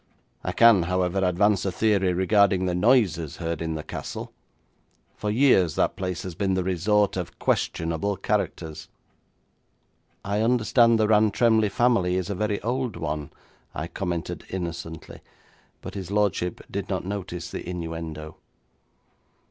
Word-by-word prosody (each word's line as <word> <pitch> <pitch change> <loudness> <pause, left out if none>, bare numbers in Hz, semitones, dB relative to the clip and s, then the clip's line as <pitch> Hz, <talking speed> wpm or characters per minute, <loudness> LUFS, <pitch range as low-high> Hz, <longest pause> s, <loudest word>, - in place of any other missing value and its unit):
I - - -2
can, 115 -5 +6
however, 90 +1 0
advance 95 +2 +2
a 95 - -1
theory 100 -1 +2
regarding 95 +1 +3
the 90 - 0
noises 90 - +2
heard 85 -2 -3
in 80 -1 -2
the 75 - -5
castle. - - -6 0.8
For 105 - -3
years 105 - +4
that - - +1
place 90 -2 -4
has 95 - -6
been 95 +1 0
the 95 - 0
resort 95 +3 +1
of 90 -2 -5
questionable 85 +5 -1
characters.' 80 -2 -3 1.4
'I 100 +2 0
understand 115 0 +4
the 110 - +3
Rantremly 110 +1 +3
family 100 -7 +2
is 95 +1 -2
a - - 0
very 105 +1 -1
old 125 -1 -1
one,' 75 -2 -4 0.5
I 80 - -3
commented 85 -1 -4
innocently, 85 -3 -6 0.6
but - - -8
his 95 -3 -6
lordship 100 -4 0
did - - -4
not - - -2
notice 90 -3 -5
the - - -6
innuendo. 80 -3 -6
95 Hz, 140 wpm, -25 LUFS, 85-105 Hz, 1.4 s, can